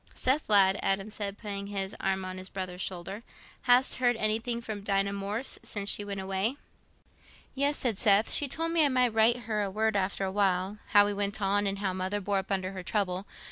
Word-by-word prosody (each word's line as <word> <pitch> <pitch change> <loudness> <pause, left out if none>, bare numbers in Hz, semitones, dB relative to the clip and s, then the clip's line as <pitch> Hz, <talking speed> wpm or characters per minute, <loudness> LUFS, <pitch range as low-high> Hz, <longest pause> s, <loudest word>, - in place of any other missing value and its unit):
"Seth, 265 +2 0
lad," 195 -2 +5
Adam 195 +2 -1
said, 205 -1 -3
putting 200 -2 -5
his 195 -1 -3
arm 190 -1 -1
on 185 0 -6
his 185 0 -5
brother's 185 -1 -5
shoulder, 190 +3 -4 0.5
"hast 250 +2 +4
heard 245 -1 +3
anything 225 +2 0
from 215 -3 -6
Dinah 200 0 0
Morris 200 +5 0
since 205 -1 0
she 205 - -2
went 200 -1 -5
away?" 195 +7 -1 1.0
"Yes," 285 +2 +1
said 225 -6 -1
Seth. 205 0 +4
"She 290 - +1
told 330 +5 -2
me 330 -2 +4
I 290 - +4
might 250 -3 +2
write 225 +2 +3
her 210 -3 -2
word 220 +2 0
after 195 0 0
a 190 - -3
while, 195 0 0
how 205 0 +6
we 205 - -1
went 200 +1 -1
on, 205 0 +1
and 195 0 -2
how 195 -2 -2
mother 190 +2 -2
bore 200 0 0
up 190 +1 -7
under 190 -1 -1
her 190 -1 -6
trouble. 190 0 -1
200 Hz, 210 wpm, -29 LUFS, 195-220 Hz, 1.0 s, how